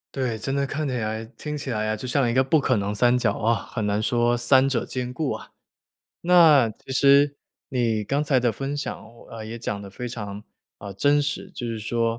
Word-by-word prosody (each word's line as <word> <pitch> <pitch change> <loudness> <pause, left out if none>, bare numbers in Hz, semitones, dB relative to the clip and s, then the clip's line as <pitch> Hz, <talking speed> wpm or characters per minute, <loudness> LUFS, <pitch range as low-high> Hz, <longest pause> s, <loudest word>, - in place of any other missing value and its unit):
对， 125 -5 -1
真 135 +6 -3
的 140 0 0
看 150 +2 -3
起 130 - -2
来 110 -1 -3
听 150 +6 -7
起 140 - -5
来 110 -1 -1
啊， 110 - 0
就 110 - -7
像 130 -1 +1
一 - - 0
个 130 +2 +4
不 145 +4 +3
可 130 -2 +1
能 100 -1 -1
三 120 +4 +3
角 120 -4 +1
啊， 115 +1 +2 0.2
很 110 -3 -2
难 105 +1 0
说 120 +1 +2
三 130 +3 +4
者 130 -4 -1
兼 125 -1 -4
顾 145 +1 -2
啊。 - - -7 0.7
那 160 -9 +6
其 120 +5 -10
实 140 +1 +4 0.3
你 115 -4 0
刚 140 +7 0
才 140 -3 +2
的 120 -2 +1
分 135 +5 -4
享 145 - -4 0.3
呃， 115 -1 -7
也 115 +2 -7
讲 105 -3 -4
得 100 - -9
非 125 +5 -6
常 105 -3 -6 0.3
呃， 100 -1 -8
真 145 +8 +3
实， 145 +6 -3
就 140 -9 -6
是 115 -1 -3
说 115 +1 -1
120 Hz, 240 characters per minute, -24 LUFS, 110-140 Hz, 0.7 s, 那